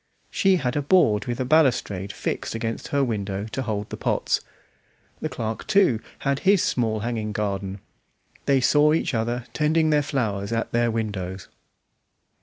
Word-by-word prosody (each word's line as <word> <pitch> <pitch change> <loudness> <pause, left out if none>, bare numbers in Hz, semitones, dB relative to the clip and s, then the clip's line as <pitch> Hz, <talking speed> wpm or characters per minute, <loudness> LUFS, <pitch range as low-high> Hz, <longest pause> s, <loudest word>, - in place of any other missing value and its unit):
She 195 -1 +3
had 130 -8 -1
a 145 - +1
board 140 - +3
with 120 -1 -3
a 130 - 0
balustrade 125 - +2
fixed - - -3
against 115 0 -3
her 140 -1 +1
window 100 -5 -2
to 115 +4 -4
hold 105 -4 -3
the - - -5
pots. - - 0 0.8
The - - -3
clerk, 110 -1 -4
too, 190 - +4 0.3
had 140 0 +1
his 195 -1 +4
small 110 -3 0
hanging 110 -2 -2
garden; 100 -2 -3 0.7
they 135 -1 +4
saw 150 +4 +4
each 160 - 0
other 120 +1 -1
tending 155 +1 +2
their 150 -1 +4
flowers 110 -8 -2
at 115 0 -1
their 120 0 +2
windows. 100 -4 -4
120 Hz, 160 wpm, -24 LUFS, 105-140 Hz, 0.8 s, too